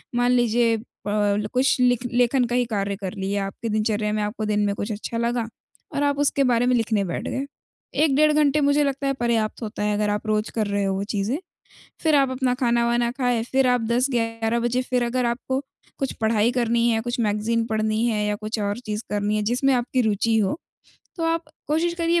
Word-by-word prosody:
मान 245 Hz, +1 st, +3 dB
लीजिए 235 Hz, -1 st, +3 dB, 0.3 s
प -, -, 0 dB, 0.3 s
ल 210 Hz, -, -2 dB
कुछ 255 Hz, 0 st, +2 dB
लिख 245 Hz, -1 st, +2 dB
लेखन 245 Hz, +1 st, +3 dB
का 240 Hz, +1 st, -2 dB
ही 250 Hz, -, +2 dB
कार्य 200 Hz, -3 st, -2 dB
कर 190 Hz, -2 st, -5 dB
लिया, 195 Hz, 0 st, -2 dB
आपकी 225 Hz, +4 st, -6 dB
दिनचर्या 215 Hz, 0 st, 0 dB
में 215 Hz, -, 0 dB
आपको 210 Hz, +1 st, -3 dB
दिन 210 Hz, 0 st, 0 dB
में 200 Hz, -, +1 dB
कुछ 205 Hz, +2 st, -4 dB
अच्छा 220 Hz, +2 st, -4 dB
लगा, 235 Hz, 0 st, 0 dB, 0.5 s
और 285 Hz, -, +1 dB
आप 285 Hz, 0 st, +1 dB
उसके 280 Hz, -1 st, +2 dB
बारे 245 Hz, -1 st, +2 dB
में 250 Hz, 0 st, +3 dB
लिखने 225 Hz, -3 st, +1 dB
बैठ 170 Hz, -, -4 dB
गए। 270 Hz, -, -2 dB, 0.6 s
1 285 Hz, -4 st, +3 dB
डेढ़ 305 Hz, +1 st, +5 dB
घंटे 300 Hz, 0 st, +3 dB
मुझे 285 Hz, +1 st, +3 dB
लगता 275 Hz, 0 st, -1 dB
है 275 Hz, -, +1 dB
पर्याप्त 235 Hz, -3 st, -1 dB
होता 210 Hz, -1 st, -4 dB
है 210 Hz, 0 st, +1 dB
अगर 210 Hz, 0 st, 0 dB
आप 210 Hz, +1 st, -2 dB
रोज़ 215 Hz, 0 st, 0 dB
कर 215 Hz, -2 st, 0 dB
रहे 200 Hz, 0 st, 0 dB
हो 195 Hz, -1 st, 0 dB
वो 195 Hz, -, -2 dB
चीज़ें, 210 Hz, +6 st, -1 dB, 0.7 s
फिर 315 Hz, -2 st, +4 dB
आप 275 Hz, -2 st, +4 dB
अपना 255 Hz, -1 st, 0 dB
खाना-वाना 235 Hz, -1 st, +1 dB
खाएँ, 245 Hz, -3 st, 0 dB
फिर 265 Hz, 0 st, +3 dB
आप 250 Hz, -1 st, +2 dB
10-11 235 Hz, -2 st, 0 dB
बजे 240 Hz, +2 st, 0 dB
फिर 250 Hz, -1 st, 0 dB
अगर 245 Hz, +1 st, 0 dB
आपको 255 Hz, +3 st, -1 dB, 0.4 s
कुछ 270 Hz, -, -1 dB
पढ़ाई 220 Hz, +1 st, +2 dB
करनी 235 Hz, -1 st, +1 dB
है, 225 Hz, -1 st, +1 dB
कुछ 240 Hz, +2 st, -3 dB
मैगज़ीन 225 Hz, +1 st, 0 dB
पढ़नी 220 Hz, +1 st, 0 dB
हैं, 210 Hz, -2 st, 0 dB
या 210 Hz, -, 0 dB
कुछ 215 Hz, +1 st, -4 dB
और 205 Hz, 0 st, -1 dB
चीज़ 215 Hz, -2 st, -4 dB
करनी 205 Hz, 0 st, 0 dB
हैं 210 Hz, -, 0 dB
जिसमें 250 Hz, +5 st, +2 dB
आपकी 250 Hz, +1 st, +1 dB
रुचि 220 Hz, 0 st, +1 dB
हो, 210 Hz, +8 st, +1 dB, 0.6 s
तो 330 Hz, -, -2 dB
आप 330 Hz, 0 st, 0 dB, 0.2 s
कोशिश 335 Hz, +3 st, +1 dB
करिए 340 Hz, 0 st, +1 dB
235 Hz, 215 wpm, -23 LUFS, 215-255 Hz, 0.7 s, डेढ़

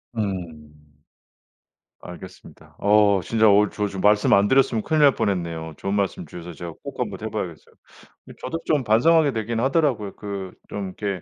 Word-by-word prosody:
음. 85 Hz, -8 st, -5 dB, 1.3 s
알겠습니다. -, -, -12 dB
어 100 Hz, -2 st, +4 dB
진짜 110 Hz, +1 st, +3 dB
어 105 Hz, +1 st, +4 dB
저 105 Hz, -1 st, -2 dB
좀 95 Hz, -1 st, -6 dB
말씀 105 Hz, 0 st, +4 dB
안 100 Hz, +1 st, +5 dB
드렸으면 130 Hz, -4 st, +2 dB
큰일 155 Hz, -1 st, +1 dB
날 140 Hz, -3 st, +6 dB
뻔했네요. 85 Hz, -4 st, -2 dB
좋은 100 Hz, +1 st, -3 dB
말씀 100 Hz, -4 st, -1 dB
주셔서 85 Hz, +2 st, -9 dB
제가 85 Hz, +1 st, -8 dB
꼭 -, -, -8 dB
한번 -, -, -3 dB
해 -, -, -4 dB
봐야겠어요. -, -, -6 dB, 0.5 s
이 -, -, -11 dB
저도 165 Hz, +6 st, -4 dB
좀 145 Hz, -4 st, +1 dB
반성하게 145 Hz, +7 st, +4 dB
되긴 115 Hz, +1 st, -2 dB
하더라고요. 135 Hz, -7 st, 0 dB
그 100 Hz, -2 st, -6 dB, 0.2 s
좀 100 Hz, -2 st, -4 dB
이렇게 100 Hz, -4 st, -3 dB
105 Hz, 345 characters per minute, -23 LUFS, 95-115 Hz, 1.3 s, 날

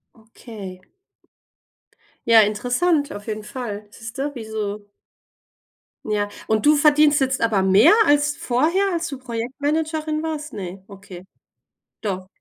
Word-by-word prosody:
Okay. 220 Hz, -4 st, -11 dB, 1.5 s
Ja, 230 Hz, -2 st, +7 dB
interessant, 250 Hz, +9 st, 0 dB
auf 205 Hz, 0 st, -9 dB
jeden 215 Hz, -1 st, -4 dB
Fall. 210 Hz, -4 st, -6 dB
Siehste, 250 Hz, +6 st, -5 dB
wie 235 Hz, -4 st, -7 dB
so 210 Hz, -1 st, -5 dB, 1.2 s
Ja, 210 Hz, -1 st, -1 dB, 0.2 s
und 220 Hz, -1 st, 0 dB
du 300 Hz, +1 st, +6 dB
verdienst 300 Hz, 0 st, +4 dB
jetzt 265 Hz, 0 st, 0 dB
aber 220 Hz, -4 st, +2 dB
mehr 190 Hz, -, +6 dB
als 290 Hz, 0 st, +2 dB
vorher, 315 Hz, +11 st, +1 dB
als 340 Hz, -1 st, -2 dB
du 275 Hz, -4 st, -7 dB
Projektmanagerin 300 Hz, +6 st, -2 dB
warst? 310 Hz, -1 st, -4 dB
Ne, 190 Hz, -2 st, -7 dB
okay. 195 Hz, -2 st, -12 dB, 0.8 s
Doch. 185 Hz, -3 st, -4 dB
235 Hz, 120 wpm, -22 LUFS, 210-295 Hz, 1.5 s, Ja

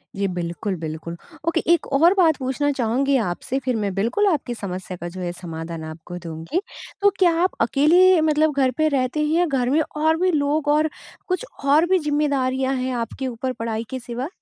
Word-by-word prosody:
जी, 200 Hz, 0 st, 0 dB
बिल्कुल, 175 Hz, +3 st, -3 dB
बिल्कुल। 160 Hz, +1 st, -6 dB, 0.3 s
ओके, 335 Hz, 0 st, +2 dB
एक 345 Hz, -, 0 dB
और 330 Hz, +6 st, +5 dB
बात 325 Hz, -5 st, +4 dB
पूछना 265 Hz, +2 st, -1 dB
चाहूँगी 270 Hz, +1 st, +1 dB
आपसे, 245 Hz, +9 st, -3 dB
फिर 255 Hz, -2 st, +1 dB
मैं 200 Hz, -2 st, -1 dB
बिल्कुल 235 Hz, -, +1 dB
आपकी 290 Hz, -9 st, 0 dB
समस्या 185 Hz, -3 st, -6 dB
का 175 Hz, -, -6 dB
जो 185 Hz, -, -5 dB
है, 175 Hz, -1 st, -2 dB
समाधान 165 Hz, -2 st, -7 dB
आपको 160 Hz, +3 st, -8 dB
दूँगी। 165 Hz, -, -3 dB, 0.4 s
तो 405 Hz, -, +6 dB
क्या 360 Hz, -3 st, +5 dB
आप 370 Hz, -, 0 dB
अकेले 345 Hz, +6 st, +5 dB
मतलब 310 Hz, 0 st, +2 dB
घर 260 Hz, -, +3 dB
पे 310 Hz, -, +3 dB
रहते 265 Hz, 0 st, 0 dB
हैं 310 Hz, +2 st, +1 dB
या 355 Hz, -, +4 dB
घर 265 Hz, -6 st, 0 dB
में 300 Hz, +4 st, +3 dB
और 315 Hz, +1 st, 0 dB
भी 370 Hz, 0 st, +3 dB
लोग 295 Hz, -1 st, 0 dB
और 310 Hz, +1 st, +2 dB, 0.4 s
कुछ 370 Hz, +7 st, -1 dB, 0.2 s
और 295 Hz, +4 st, +5 dB
भी 375 Hz, 0 st, +4 dB
ज़िम्मेदारियाँ 275 Hz, -3 st, 0 dB
हैं 255 Hz, 0 st, -2 dB
आपके 235 Hz, +3 st, -3 dB
ऊपर, 255 Hz, +1 st, -3 dB
पढ़ाई 225 Hz, -2 st, -3 dB
के 260 Hz, -, -4 dB
सिवा? 245 Hz, +2 st, -5 dB
265 Hz, 195 wpm, -22 LUFS, 205-310 Hz, 0.4 s, तो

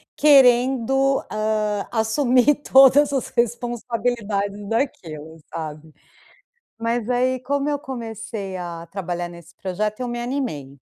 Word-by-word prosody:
querendo, 270 Hz, -1 st, +4 dB
hã, 215 Hz, -1 st, -1 dB
assumir 245 Hz, +4 st, +3 dB
todas 280 Hz, +1 st, +5 dB
as 265 Hz, -, -1 dB
responsabilidades 230 Hz, -4 st, -2 dB
daquilo, 165 Hz, -, -3 dB, 0.2 s
sabe. 155 Hz, -1 st, -7 dB, 0.8 s
Mas 230 Hz, 0 st, -2 dB
aí 255 Hz, +1 st, +1 dB
como 280 Hz, +2 st, -1 dB
eu 290 Hz, -, -1 dB
comecei 225 Hz, -7 st, -6 dB
a 170 Hz, -2 st, -6 dB
trabalhar 175 Hz, -1 st, -4 dB
nesse 170 Hz, -1 st, -14 dB
projeto, 210 Hz, +6 st, -3 dB
me 240 Hz, 0 st, -4 dB
animei. 240 Hz, -, -3 dB
230 Hz, 105 wpm, -22 LUFS, 195-255 Hz, 0.8 s, todas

